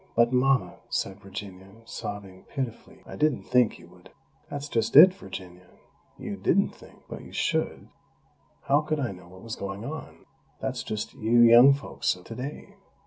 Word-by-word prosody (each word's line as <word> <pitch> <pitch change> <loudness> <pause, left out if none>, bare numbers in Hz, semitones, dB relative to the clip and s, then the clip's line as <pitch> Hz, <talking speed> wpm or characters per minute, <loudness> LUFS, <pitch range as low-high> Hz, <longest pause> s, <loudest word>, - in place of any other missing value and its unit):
"But, 120 +1 +4
Mama," 135 +1 +2
said 95 +1 -2
Virginia, 95 -1 -9 0.2
sobbing 100 -4 -8
pitifully, 130 -5 -6
"I - - -9
didn't 150 -3 +1
think 125 -3 +2
you 85 - -16
would 90 0 -18 0.2
" - - -36
"That's 145 0 -5
just 115 -4 -1
it, 180 +6 +10
Virginia, 90 - -10 0.5
you - - -6
didn't - - +2
think!! - - -17
But - - -8
you - - -13
should! - - -1 0.8
How 140 +2 +3
could 155 0 -2
I 130 -6 -1
know 90 -2 -12
what 95 +1 -14
was 115 -1 -5
going 100 +2 -6
on? 155 +4 -8 0.3
That's - - -3
just 105 -1 -5
you 115 +2 +3
young 120 +4 +8
folks 120 -4 -2
of 90 - -15
today. 125 +8 -8
115 Hz, 170 wpm, -26 LUFS, 95-135 Hz, 0.8 s, it